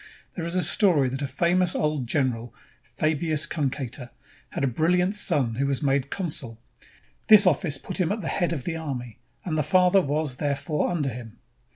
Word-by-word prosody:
There 170 Hz, -3 st, -4 dB
is 170 Hz, -, -2 dB
a 180 Hz, -, +2 dB
story 165 Hz, -, +3 dB
that 135 Hz, +2 st, -5 dB
a 140 Hz, -, -1 dB
famous 175 Hz, +4 st, +1 dB
old 150 Hz, -5 st, -1 dB
general, 120 Hz, -4 st, -1 dB, 0.3 s
Fabius 155 Hz, +3 st, -1 dB
Cunctator, 135 Hz, -4 st, -4 dB, 0.4 s
had -, -, -4 dB
a -, -, +3 dB
brilhant 180 Hz, -, +1 dB
son 150 Hz, -, +1 dB
who 140 Hz, +1 st, 0 dB
was 140 Hz, +1 st, -1 dB
made 140 Hz, -1 st, +1 dB
consul. 140 Hz, -, -4 dB, 0.7 s
This 215 Hz, -2 st, +8 dB
office 155 Hz, -3 st, +1 dB
put 135 Hz, -, -6 dB
him 180 Hz, -1 st, +1 dB
at 215 Hz, +1 st, -2 dB
the 165 Hz, -, -4 dB
head 175 Hz, -, 0 dB
of 150 Hz, -7 st, -3 dB
the 165 Hz, -, -3 dB
army, 130 Hz, -8 st, -6 dB, 0.3 s
and 165 Hz, -4 st, -2 dB
the -, -, +3 dB
father 185 Hz, +4 st, +4 dB
was, 145 Hz, -4 st, -2 dB
therefore, 145 Hz, +1 st, -1 dB
under 155 Hz, -6 st, -1 dB
him. 120 Hz, -2 st, -9 dB
150 Hz, 185 wpm, -25 LUFS, 135-175 Hz, 0.7 s, This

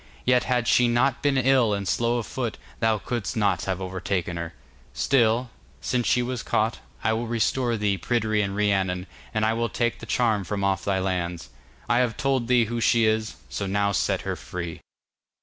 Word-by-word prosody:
Yet 125 Hz, 0 st, +3 dB
had 125 Hz, -2 st, 0 dB
she 125 Hz, -, +5 dB
not 120 Hz, +3 st, +2 dB
been 140 Hz, -2 st, +2 dB
ill 130 Hz, -4 st, +3 dB
and 100 Hz, -1 st, -4 dB
slow 120 Hz, +4 st, +1 dB
of 115 Hz, -, -3 dB
foot, 120 Hz, -1 st, -3 dB, 0.2 s
thou 110 Hz, -1 st, +2 dB
couldst 115 Hz, 0 st, -3 dB
not 105 Hz, -2 st, +1 dB
have 95 Hz, -1 st, -2 dB
overtaken 95 Hz, -1 st, -2 dB
her. 85 Hz, -5 st, -5 dB, 0.4 s
Still, 120 Hz, -1 st, +2 dB, 0.3 s
since 125 Hz, -2 st, -1 dB
she 125 Hz, -, +3 dB
was 125 Hz, -1 st, -3 dB
caught, 110 Hz, +2 st, 0 dB, 0.2 s
I 110 Hz, -, +2 dB
will 115 Hz, +1 st, -2 dB
restore 120 Hz, +1 st, 0 dB
thee 100 Hz, -2 st, 0 dB
Pryderi 110 Hz, 0 st, +1 dB
and 100 Hz, -1 st, -2 dB
Rhiannon, 95 Hz, -3 st, +1 dB, 0.3 s
and 110 Hz, -2 st, +1 dB
will 115 Hz, 0 st, 0 dB
take 120 Hz, -1 st, -1 dB
the 115 Hz, -, -9 dB
charm 110 Hz, -4 st, +1 dB
from 100 Hz, +2 st, -3 dB
off 95 Hz, -2 st, +1 dB
thy 100 Hz, -1 st, 0 dB
lands. 90 Hz, -3 st, -2 dB, 0.4 s
I 120 Hz, -, +3 dB
have 120 Hz, -3 st, 0 dB
told 135 Hz, -3 st, 0 dB
thee 125 Hz, -2 st, +4 dB
who 115 Hz, +1 st, -3 dB
she 115 Hz, 0 st, +4 dB
is; 110 Hz, 0 st, 0 dB
so 100 Hz, -, -4 dB
now 100 Hz, +1 st, +1 dB
set 100 Hz, -, 0 dB
her -, -, -3 dB
free. 85 Hz, -2 st, -6 dB
110 Hz, 190 wpm, -25 LUFS, 100-120 Hz, 0.4 s, she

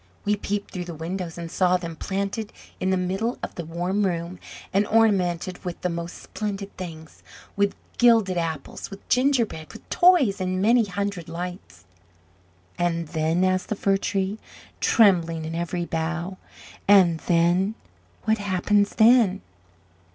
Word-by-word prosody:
We 210 Hz, 0 st, +2 dB
peeped 205 Hz, 0 st, -3 dB
through 180 Hz, -1 st, -5 dB
the 170 Hz, -2 st, -7 dB
windows, 170 Hz, +2 st, -5 dB
and 170 Hz, -1 st, -6 dB
saw 180 Hz, -1 st, +3 dB
them 170 Hz, -2 st, -6 dB
planted 200 Hz, +5 st, -3 dB, 0.3 s
in 185 Hz, -, 0 dB
the 190 Hz, -, +2 dB
middle 195 Hz, +7 st, -1 dB
of -, -, -4 dB
the 170 Hz, -, -5 dB
warm 175 Hz, +5 st, -1 dB
room, 175 Hz, -1 st, -2 dB, 0.3 s
and 200 Hz, +2 st, +2 dB
ornamented 185 Hz, -5 st, +2 dB
with 180 Hz, -2 st, -5 dB
the 180 Hz, -, 0 dB
most 170 Hz, +1 st, -5 dB
splendid 200 Hz, -2 st, -5 dB
things 160 Hz, -3 st, -9 dB, 0.3 s
with 200 Hz, 0 st, +1 dB, 0.2 s
gilded 225 Hz, -6 st, +5 dB
apples, 165 Hz, -4 st, -4 dB
with 195 Hz, 0 st, -11 dB
gingerbread, 250 Hz, -, +1 dB
with -, -, -13 dB
toys, 290 Hz, -, +4 dB
and 185 Hz, 0 st, -1 dB
many 230 Hz, +4 st, +4 dB
hundred 200 Hz, -3 st, -4 dB
lights!" 170 Hz, -, -7 dB, 0.9 s
"And 170 Hz, -2 st, 0 dB
then?" 165 Hz, +2 st, +1 dB
asked 185 Hz, 0 st, +1 dB
the 215 Hz, -, 0 dB
Fir 195 Hz, 0 st, +2 dB
tree, 195 Hz, +1 st, -2 dB, 0.4 s
trembling 170 Hz, -8 st, +3 dB
in 160 Hz, -, -5 dB
every 170 Hz, +1 st, -2 dB
bough. 170 Hz, +3 st, -3 dB, 0.5 s
"And 185 Hz, -5 st, +6 dB
then? 175 Hz, +5 st, +3 dB, 0.5 s
What 220 Hz, 0 st, +1 dB
happens 205 Hz, +1 st, +1 dB
then?" 225 Hz, -3 st, +5 dB
185 Hz, 145 wpm, -24 LUFS, 170-205 Hz, 0.9 s, And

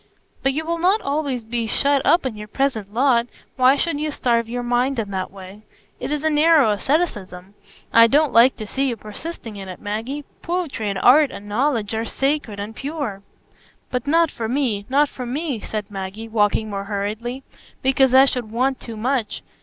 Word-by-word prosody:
"But 270 Hz, 0 st, +1 dB
you 315 Hz, +3 st, -2 dB
will 335 Hz, +1 st, -2 dB
not 375 Hz, +5 st, +3 dB
always 280 Hz, -4 st, -2 dB
be 230 Hz, 0 st, -2 dB
shut 280 Hz, +4 st, +2 dB
up 340 Hz, -4 st, +3 dB
in 250 Hz, -4 st, -2 dB
your 210 Hz, 0 st, -8 dB
present 220 Hz, -4 st, -1 dB
lot; 240 Hz, 0 st, +2 dB, 0.3 s
why 260 Hz, +1 st, +5 dB
should 290 Hz, 0 st, -1 dB
you 305 Hz, +1 st, -1 dB
starve 235 Hz, -5 st, 0 dB
your 245 Hz, +1 st, -3 dB
mind 245 Hz, +2 st, +1 dB
in 210 Hz, -3 st, -3 dB
that 190 Hz, -1 st, -3 dB
way? 195 Hz, +1 st, -12 dB, 0.4 s
It -, -, -4 dB
is 300 Hz, 0 st, -2 dB
narrow 310 Hz, -5 st, +4 dB
asceticism; 205 Hz, -, -2 dB, 0.4 s
I 230 Hz, 0 st, +8 dB
don't 295 Hz, +4 st, +2 dB
like 240 Hz, +3 st, +6 dB
to 215 Hz, -, -6 dB
see 270 Hz, +6 st, -1 dB
you 235 Hz, -, -3 dB
persisting 215 Hz, +1 st, -8 dB
in 195 Hz, -1 st, -8 dB
it, 185 Hz, -, -8 dB
Maggie. 230 Hz, +8 st, -4 dB, 0.2 s
Poetry 335 Hz, -, -2 dB
and 195 Hz, -, -2 dB
art 275 Hz, +8 st, +6 dB
and 205 Hz, -3 st, -9 dB
knowledge 225 Hz, -1 st, 0 dB
are 220 Hz, +1 st, -1 dB
sacred 270 Hz, -6 st, -1 dB
and 210 Hz, +2 st, -6 dB
pure." 275 Hz, -8 st, -4 dB, 0.7 s
"But 250 Hz, +1 st, -2 dB
not 330 Hz, +1 st, +3 dB
for 225 Hz, -, -4 dB
me, 240 Hz, -6 st, -1 dB
not 285 Hz, +3 st, +4 dB
for 250 Hz, -3 st, -7 dB
me," 280 Hz, -1 st, -2 dB
said 210 Hz, 0 st, -5 dB
Maggie, 195 Hz, +3 st, -6 dB
walking 215 Hz, -1 st, +1 dB
more 200 Hz, -1 st, -4 dB
hurriedly; 215 Hz, +6 st, -4 dB, 0.4 s
"because 265 Hz, 0 st, +4 dB
I 265 Hz, +1 st, +8 dB
should 250 Hz, -5 st, -2 dB
want 255 Hz, +3 st, 0 dB
too 230 Hz, -2 st, -8 dB
much. 245 Hz, 0 st, -1 dB
245 Hz, 190 wpm, -21 LUFS, 215-280 Hz, 0.7 s, I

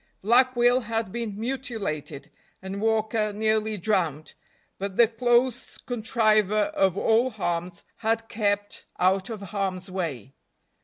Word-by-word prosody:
Black 250 Hz, +4 st, +4 dB
Will 245 Hz, +1 st, +4 dB
had 225 Hz, -4 st, -3 dB
been 220 Hz, -3 st, -4 dB
mutilated, 220 Hz, -, -4 dB, 0.3 s
and 190 Hz, +1 st, -6 dB
Walker 220 Hz, -1 st, +1 dB
nearly 215 Hz, 0 st, 0 dB
drowned, 170 Hz, -6 st, -1 dB, 0.5 s
but 195 Hz, 0 st, -4 dB
"the 235 Hz, -, +7 dB
close 240 Hz, +2 st, +1 dB
contriver 215 Hz, -2 st, +1 dB
of 195 Hz, -, +2 dB
all 230 Hz, +5 st, +3 dB
harms" 175 Hz, -5 st, -3 dB
had 225 Hz, 0 st, -1 dB
kept 205 Hz, -2 st, -1 dB
out 190 Hz, +2 st, +2 dB
of 220 Hz, -3 st, -6 dB
harm's 190 Hz, -1 st, -3 dB
way. 145 Hz, -, -4 dB
215 Hz, 120 wpm, -26 LUFS, 190-230 Hz, 0.5 s, the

